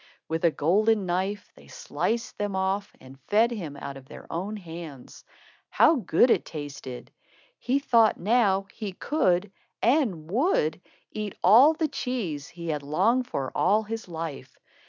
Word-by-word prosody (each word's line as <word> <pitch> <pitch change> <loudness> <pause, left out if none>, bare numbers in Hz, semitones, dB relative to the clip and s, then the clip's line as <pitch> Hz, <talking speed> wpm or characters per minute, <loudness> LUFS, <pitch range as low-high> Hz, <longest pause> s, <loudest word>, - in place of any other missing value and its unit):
With 160 +1 -3
a - - +6
golden 200 +7 +2
knife, 190 +3 -2
they - - -17
sliced 485 - -3
them 205 -2 -2
off 190 +2 -1
and 135 +1 -14
fed 225 +3 +3
him 165 -11 -6
out 140 0 -7
of 130 -1 -14
their - - -11
own 195 +6 -3
hands. 165 -7 -10 0.5
How 325 - +4
good 235 +2 +3
it - - +3
tasted! 145 -5 -8 0.5
He 255 +3 +1
thought 230 -5 +3
now 200 -1 +2
he 210 -4 -6
could, 190 - 0 0.3
and 225 - +1
would, 200 - +1 0.3
eat 210 -2 -5
all 240 - +7
the 315 0 0
cheese 230 - -4
he 170 -1 -8
had 150 -2 -1
longed 205 - +1
for 135 - -3
all 215 +2 +2
his 225 0 -6
life. 165 -4 -7
195 Hz, 155 wpm, -26 LUFS, 160-230 Hz, 0.5 s, all